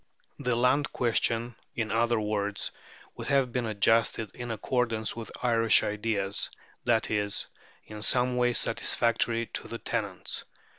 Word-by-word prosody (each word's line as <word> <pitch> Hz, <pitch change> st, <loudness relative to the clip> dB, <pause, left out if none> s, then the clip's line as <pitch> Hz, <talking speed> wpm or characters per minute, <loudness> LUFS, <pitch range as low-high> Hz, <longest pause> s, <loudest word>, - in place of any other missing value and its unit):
The 125 Hz, -1 st, 0 dB
land 125 Hz, +5 st, +2 dB
question, 120 Hz, 0 st, +1 dB, 0.2 s
in 115 Hz, -2 st, -2 dB
other 115 Hz, +1 st, +2 dB
words, 105 Hz, -1 st, -2 dB, 0.4 s
would -, -, -7 dB
have 135 Hz, -3 st, +2 dB
been 120 Hz, -1 st, -1 dB
adjusted 110 Hz, +1 st, +2 dB
in 120 Hz, 0 st, -6 dB
accordance 115 Hz, -1 st, -1 dB
with 115 Hz, -1 st, -7 dB
"Irish 115 Hz, -2 st, +4 dB
ideas," 105 Hz, -2 st, 0 dB, 0.4 s
that 115 Hz, -2 st, +2 dB
is, 105 Hz, -1 st, 0 dB, 0.4 s
in 105 Hz, -1 st, -9 dB
some 125 Hz, +3 st, +3 dB
way 125 Hz, 0 st, +2 dB
satisfactory 115 Hz, 0 st, +2 dB
to -, -, -4 dB
the 115 Hz, -, -5 dB
tenants. 105 Hz, -6 st, -3 dB
115 Hz, 135 wpm, -28 LUFS, 110-120 Hz, 0.4 s, Irish